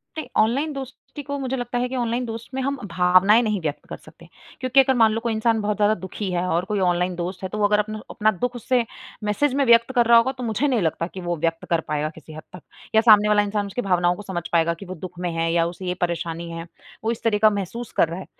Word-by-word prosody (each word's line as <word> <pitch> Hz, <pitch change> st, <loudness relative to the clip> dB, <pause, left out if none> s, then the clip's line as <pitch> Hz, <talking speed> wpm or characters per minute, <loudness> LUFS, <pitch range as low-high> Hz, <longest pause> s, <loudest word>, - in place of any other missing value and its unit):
ते 310 Hz, -5 st, -5 dB
ऑनलाइन 275 Hz, +8 st, +2 dB
दोस्ती 270 Hz, +2 st, -8 dB
को 285 Hz, 0 st, -4 dB
मुझे 265 Hz, 0 st, -2 dB
लगता 245 Hz, 0 st, -3 dB
है 250 Hz, +1 st, 0 dB
कि 260 Hz, -, -4 dB
ऑनलाइन 240 Hz, 0 st, -1 dB
दोस्त 225 Hz, 0 st, -7 dB
में 265 Hz, -, -2 dB
हम 275 Hz, +1 st, -1 dB
भावनाएँ 185 Hz, +6 st, +5 dB
नहीं 215 Hz, -4 st, 0 dB
व्यक्त 150 Hz, -2 st, -4 dB
कर -, -, -6 dB
सकते। -, -, -17 dB, 0.3 s
क्योंकि 255 Hz, +1 st, +3 dB
अगर 265 Hz, 0 st, +5 dB
मान 225 Hz, -2 st, +5 dB
लो 225 Hz, -, -1 dB
कोई 235 Hz, -1 st, -1 dB
इंसान 220 Hz, 0 st, +1 dB
बहुत 210 Hz, 0 st, -1 dB
ज़्यादा 210 Hz, +1 st, +3 dB
दुखी 190 Hz, +2 st, -5 dB
है 175 Hz, 0 st, 0 dB
और 175 Hz, +2 st, 0 dB
कोई 205 Hz, -1 st, -2 dB
ऑनलाइन 180 Hz, 0 st, +1 dB
दोस्त 180 Hz, +2 st, -5 dB
है 190 Hz, -, -3 dB
तो 210 Hz, -, -5 dB
वो 205 Hz, -, +2 dB
अगर 210 Hz, 0 st, +2 dB
अपना 215 Hz, +1 st, -3 dB
अपना 215 Hz, 0 st, +1 dB
दुख 245 Hz, 0 st, -1 dB
उससे 245 Hz, 0 st, 0 dB, 0.4 s
मैसेज 255 Hz, +7 st, +1 dB
में 280 Hz, -1 st, +2 dB
व्यक्त 235 Hz, +1 st, +5 dB
कर 240 Hz, -1 st, +4 dB
रहा 235 Hz, 0 st, +7 dB
होगा 245 Hz, +3 st, +3 dB
तो 250 Hz, -, -5 dB
मुझे 230 Hz, +5 st, 0 dB
नहीं 245 Hz, -6 st, +1 dB
लगता 165 Hz, +1 st, -1 dB
कि 185 Hz, -, -7 dB
वो 175 Hz, 0 st, -2 dB
व्यक्त 165 Hz, +1 st, -2 dB
कर 165 Hz, -1 st, +2 dB
पाएगा 150 Hz, 0 st, -1 dB
किसी 155 Hz, 0 st, -13 dB
हद 155 Hz, -, -9 dB
तक। 175 Hz, -, -11 dB, 0.3 s
या 220 Hz, -, +7 dB
सामने 210 Hz, -2 st, +6 dB
वाला 210 Hz, 0 st, +4 dB
इंसान 205 Hz, 0 st, -2 dB
उसकी 245 Hz, +5 st, -3 dB
भावनाओं 180 Hz, -3 st, +2 dB
को 210 Hz, -, -9 dB
समझ 185 Hz, -4 st, -5 dB
पाएगा 170 Hz, 0 st, +3 dB
कि -, -, -7 dB
वो 185 Hz, +1 st, -7 dB
दुख 180 Hz, +1 st, -9 dB
में 175 Hz, -1 st, -2 dB
है 165 Hz, 0 st, 0 dB
या 170 Hz, -1 st, +3 dB
उसे 180 Hz, +2 st, -8 dB
ये 180 Hz, -, -1 dB
परेशानी 170 Hz, -1 st, -2 dB
है। 165 Hz, 0 st, -6 dB, 0.4 s
वो 225 Hz, -, +1 dB
इस 235 Hz, -, -6 dB
तरह 220 Hz, -2 st, +2 dB
का 215 Hz, -, +7 dB
महसूस 205 Hz, +3 st, -5 dB
कर 165 Hz, -, +5 dB
रहा 170 Hz, +3 st, -5 dB
है -, -, -8 dB
210 Hz, 275 wpm, -23 LUFS, 175-235 Hz, 0.4 s, रहा